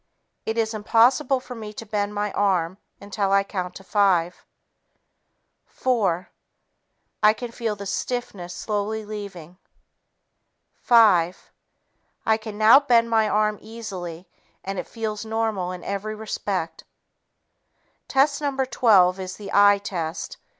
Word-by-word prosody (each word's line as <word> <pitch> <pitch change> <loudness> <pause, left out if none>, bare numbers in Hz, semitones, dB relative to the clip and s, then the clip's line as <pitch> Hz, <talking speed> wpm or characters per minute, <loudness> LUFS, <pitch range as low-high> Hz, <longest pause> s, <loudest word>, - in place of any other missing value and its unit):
It 220 +1 -2
is 225 0 0
impossible 240 +5 +3
for 255 0 -9
me 215 -3 -8
to 225 - -8
bend 205 -1 -2
my 205 0 -1
arm 190 -2 0 0.2
until 200 -1 -2
I 195 0 +4
count 185 -3 -5
to 195 - -10
five. 185 -4 +1 1.2
Four... 195 -9 -1 0.9
I 215 0 +6
can 240 +1 -7
feel 230 -2 -3
the 200 0 -8
stiffness 200 -3 -4
slowly 215 +1 -3
leaving. 195 -5 -8 1.2
Five... 190 -7 +4 0.7
I 220 0 +3
can 220 -1 -8
now 220 +5 +8
bend 235 -5 +2
my 220 -1 +3
arm 210 0 +1
easily 185 -6 -8 0.4
and 195 -1 -4
it - - -5
feels 220 -2 -4
normal 220 -5 -2
in 180 -1 -8
every 200 +2 -4
respect." 200 -5 -4 1.2
Test 280 +2 +2
No. 285 -2 -2
12 195 -8 +4
is 185 0 -5
the 205 - -9
"eye" 205 0 +6
test. 190 - -5
210 Hz, 130 wpm, -24 LUFS, 190-225 Hz, 1.2 s, now